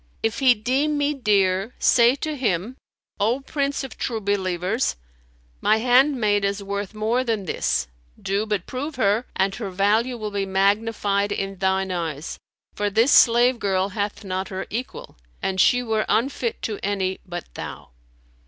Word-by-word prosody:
If 225 -1 0
he 260 -3 +5
deem 270 +7 0
me 290 +1 +1
dear, 200 -4 +1
say 240 +1 +5
to 310 +2 -4
him: 220 -2 -1 0.4
'O 230 +6 +1
Prince 280 0 -2
of 270 - -9
True 230 -3 -2
Believers, 195 +2 -1 0.7
my 220 - +4
handmaid 245 -4 +3
is 200 0 -1
worth 200 +1 -4
more 225 +4 0
than 220 -5 -2
this: - - 0 0.3
do 200 +3 -1
but 205 -4 -1
prove 285 +4 -5
her, 220 +1 +1
and 190 +1 +1
her 200 -1 -5
value 215 +6 +1
will 215 -2 -5
be 200 -1 -2
magnified 200 +1 +1
in 195 -1 -3
thine 190 0 +1
eyes; 165 -4 -4 0.3
for 205 0 -1
this 225 +7 +3
slave 240 +1 +5
girl 190 -1 0
hath 205 +1 -3
not 190 0 -3
her 190 0 -5
equal, 240 - -6 0.2
and 190 -1 0
she 245 0 +4
were 220 -2 0
unfit 240 -1 0
to 210 -3 -3
any 190 -2 -1
but 175 -1 -6
thou.'" - - -8
210 Hz, 160 wpm, -23 LUFS, 195-245 Hz, 0.7 s, he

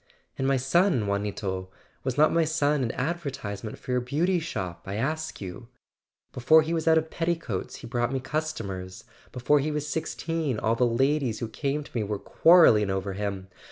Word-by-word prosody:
"And 135 - -1
my 135 0 +3
son, 135 - +2
Juanito; 100 -2 -2 0.3
was 130 0 -2
not 155 +1 +5
my 165 - +3
son 150 -2 +1
an 120 - -1
adver¬ 165 +2 -2
tisement 105 -4 -6
for 125 - -3
a - - +1
Beauty 165 +9 +1
Shop, 95 - -5
I 100 - -3
ask 155 +7 -2
you? 95 +4 -8 0.7
Before 155 +6 +5
he 160 +2 -2
was 165 -1 -2
out 160 0 +6
of 160 0 -1
petticoats 165 - -2
he - - -10
brought 120 0 -1
me 135 - -1
customers; 110 -11 -4 0.3
before 135 +4 +2
he 145 +3 -1
was 150 -1 -2
sixteen 160 -3 -2
all 110 +2 +1
the 120 +1 +2
ladies 130 0 +1
who 115 - -3
came 140 +6 -2
to - - -15
me 115 - -1
were 105 0 -2
quarrel¬ 170 - +6
ling 105 -2 +1
over 95 0 -2
him. 100 -1 -4
130 Hz, 195 wpm, -27 LUFS, 105-155 Hz, 0.7 s, out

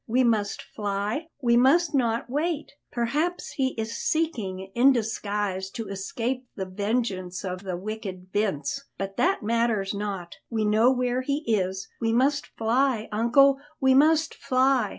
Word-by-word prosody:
We 250 +3 +3
must 215 -4 +1
fly, 205 +8 -3 0.2
we 235 -1 +4
must 295 +7 +4
not 235 -4 +1
wait. 305 +4 -2 0.2
Perhaps 295 +10 -1
he 260 -2 -1
is 220 +1 -3
seeking 200 - -2
in 255 +3 +6
disguise 205 -5 -2
to 225 - -5
escape 235 +6 -3
the 190 - -3
vengeance 195 -2 -2
of 185 -1 -4
the 185 -3 -4
wicked 190 -2 -6
Vince; 205 - -1
but 195 0 -4
that 375 - +2
matters 225 -3 +1
not; 200 -4 -4
we 220 -2 0
know 220 +4 +4
where 250 0 0
he 280 +3 -2
is; 190 -3 0
we 225 -1 +1
must 275 +4 +2
fly, 230 0 0
uncle, 270 +6 +4 0.2
we 265 -1 +4
must 315 +3 +4
fly!" 260 0 +2
230 Hz, 150 wpm, -26 LUFS, 200-265 Hz, 0.2 s, in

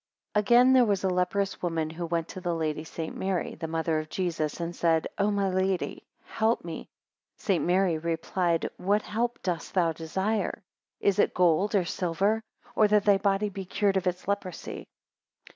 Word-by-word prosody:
AGAIN, 240 +5 +5
there 255 -1 +7
was 200 -4 +1
a 190 - +2
leprous 185 +2 0
woman 165 -3 -1
who 170 +1 -5
went 165 0 -1
to 185 - -7
the 175 -2 -1
Lady 155 -1 -2
St. 160 0 -6
Mary, 190 -2 -2
the 165 - -5
mother 160 0 0
of 155 0 -6
Jesus, 165 -5 -2
and 170 0 -4
said, 165 -2 +2
O 200 +1 +3
my 200 -1 +1
Lady, 190 0 -1 0.2
help 220 -3 0
me. 165 - -6 0.5
2 - - -20
St. 190 -5 +1
Mary 180 -2 +2
replied, 165 +1 0
What 205 +3 +1
help 235 +3 -2
does 175 -3 -2
thou 175 -3 +2
desire? 190 +7 -2 0.4
Is 200 0 +2
it - - +3
gold 180 +4 +3
or 190 -3 +3
silver, 195 +6 0 0.3
or 215 - +5
that 210 -1 +3
thy 200 -2 +5
body 200 +1 +1
be 195 0 -6
cured 195 +2 0
of 190 -1 0
its 180 0 -2
leprosy? 200 -3 -4
185 Hz, 180 wpm, -28 LUFS, 165-200 Hz, 0.5 s, there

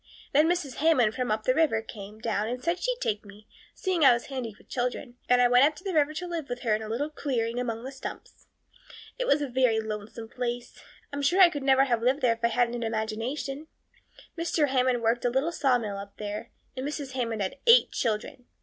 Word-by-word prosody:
Then 305 +4 +5
Mrs. 330 -8 -1
Hammond 280 -9 +3
from 250 -1 -2
up 215 0 0
the 255 - +3
river 290 -6 +2
came 210 -1 -10
down 220 -2 -1
and 250 +2 -4
said 340 +2 0
she'd - - -1
take 210 - -1
me, 205 +1 -15 0.3
seeing 370 -4 0
I 265 -3 +8
was 235 - -2
handy 235 -5 -4
with - - -22
children, 245 0 -3
and 250 0 +5
I 245 - +6
went 245 +1 +5
up 300 +2 +3
the 370 +4 -5
river 305 -1 +2
to 360 - -4
live 335 -4 -5
with 245 0 -4
her 230 -4 +1
in 215 - 0
a 215 - -6
little 285 +7 -2
clearing 245 -5 -2
among 230 -2 -3
the 265 - -6
stumps. 270 - -9 0.7
It - - -1
was 295 - +3
a - - -2
very 250 -3 +2
lonesome 220 +1 -6
place. 245 0 -5 0.3
I'm 285 - -2
sure 330 +7 +2
I 360 -3 +8
could 290 - -4
never 270 0 +4
have 240 -4 0
lived 260 +5 +1
there 240 -2 +4
if 230 0 -14
I - - +5
hadn't 240 0 +1
had 240 - -4
an 230 - -1
imagination. 245 +7 -3 0.7
Mr. 330 -3 0
Hammond 255 -2 +1
worked 230 +2 +1
a 245 - +2
little 265 +7 0
sawmill 245 -10 0
up 200 0 -10
there, 210 +2 -5 0.3
and 260 - -4
Mrs. 285 -1 -4
Hammond 230 -5 -2
had 190 - -4
eight 470 +2 +7
children. 230 +2 -3
250 Hz, 230 wpm, -27 LUFS, 225-285 Hz, 0.7 s, I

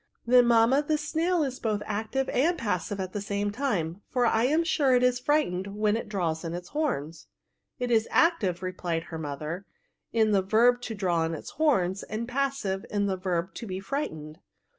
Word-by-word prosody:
^' - - -45 0.2
Then, 245 0 +6
mamma, 235 +4 +5
the 305 +1 0
snail 325 +3 0
is 265 -2 -3
both 215 -2 -1
active 220 +6 -2
and 335 +7 +2
passive 200 -2 -2
at 185 -1 -4
the 205 - -3
same 200 0 -2
time; 205 - -2
for 250 -2 +1
I 230 0 +3
am 310 +6 +3
sure 285 -6 +3
it 250 - +3
is 250 -1 +3
frightened 200 -10 0
when 210 0 +2
it 230 - -4
draws 170 -6 -1
in 165 0 -4
its 175 0 -7
horns." 205 - -3 0.5
It 245 -1 -2
is 225 -1 +3
active," 205 - +2
replied 175 -3 -2
her 160 - -4
mother, 155 +5 -5 0.2
" - - -53
in 220 -2 +3
the 200 -2 +4
verb 235 +5 +3
to 225 - -4
draw 175 -4 +1
in 165 0 -2
its - - -8
horns, 200 - +1
and 220 +2 -5
passive, 255 -7 -1
in 205 -1 0
the 195 -1 0
verb 185 -1 -2
to 230 - -7
be 185 -1 -4
frightened." 160 - -4
210 Hz, 205 wpm, -27 LUFS, 185-255 Hz, 0.5 s, Then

